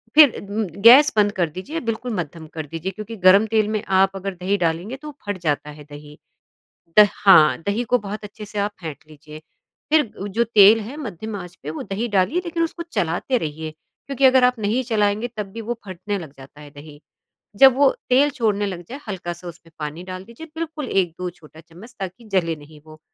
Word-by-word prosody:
फिर 300 -5 +7
उम, 220 +2 -1 0.2
गैस 270 +7 +8
बंद 205 -1 +4
कर 175 -5 0
दीजिए, 190 - -6
बिल्कुल 230 +1 -3
मद्धम 165 -2 -5
कर 155 - -4
दीजिए 165 +5 -5
क्योंकि 215 +3 -8
गर्म 195 +3 +7
तेल 215 -1 +3
में 210 - -2 0.2
आप 195 0 +3
अगर 195 0 -4
दही 185 +3 -1
डालेंगे, 170 +9 -2
तो 300 - -11
वो 300 - -9
फट 205 -2 -2
जाता 150 -1 -1
है 150 0 -11
दही। 150 0 -12 0.8
द 210 - +9 0.2
हाँ, 165 -6 +7
दही 205 +4 0
को 250 +1 +2
बहुत 205 +1 -7
अच्छे 210 +1 -10
से 205 0 -6
आप 205 +1 0
फेंट 160 -3 -6
लीजिए, 155 0 -12 0.5
फिर 305 -7 +3
उ 200 - -3
जो 225 +4 0
तेल 215 -1 +6
है 245 +8 -8
मद्धम 220 - -6
आँच 180 -1 -9
पे, 145 - -5
वो 160 - -6
दही 205 +4 -3
डालिए 205 - +1
लेकिन 335 0 -1
उसको 335 +1 -4
चलाते 175 +10 0
रहिए, 155 -3 -5
क्योंकि 270 - -4
अगर 260 -1 +6
आप 250 -1 +3
नहीं 215 +5 0
चलाएँगे 215 -1 0
तब 210 - -3
भी 230 - -6
वो 235 +2 -4
फटने 190 +3 -4
लग 155 -6 -10
जाता 140 +2 -14
है 145 - -12
दही। 145 +1 -13 0.6
जब 265 +2 +7
वो 280 -1 +6 0.2
तेल 270 +3 +4
छोड़ने 210 -5 0
लग 180 -3 -6
जाए, 270 +4 -7
हल्का-सा 175 -3 -6
उसमें 170 -1 -12
पानी 150 +3 -5
डाल 185 0 -7
दीजिए, 235 +9 -12
बिल्कुल 315 -4 -5
1-2 180 -1 -1
छोटा 160 -3 -17
चम्मच 175 +9 -15
ताकि 190 +4 -7
जले 165 -4 +1
नहीं 150 0 -15
वो, 155 0 -14
200 Hz, 210 wpm, -21 LUFS, 165-230 Hz, 0.8 s, द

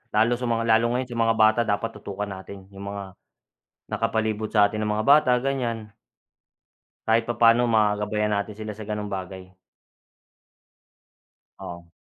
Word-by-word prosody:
lalo 110 +3 +4
sa 125 - -7
mga 115 -1 0
lalo 115 +1 +2
ngayon 125 +1 -1
sa - - -5
mga 115 0 +2
bata 110 +2 +5
dapat 110 +1 -1
tutukan 100 0 -5
natin 95 0 -9
yung 100 0 -9
mga 100 -2 -8 0.8
nakapalibot 110 -1 -1
sa 105 -1 +4
atin 110 +1 -5
na 105 - -1
mga 105 +1 -1
bata 140 -3 +5
ganyan 115 -6 -2 1.2
kahit 115 +1 +3
papaano 120 +1 +4
magabayan 105 -1 +1
natin 100 +1 -3
sila 110 0 -6
sa 110 - -8
ganung 105 -1 -4
bagay. 95 -1 -7 2.1
Oo. 85 -1 -9
110 Hz, 145 wpm, -24 LUFS, 100-115 Hz, 2.1 s, bata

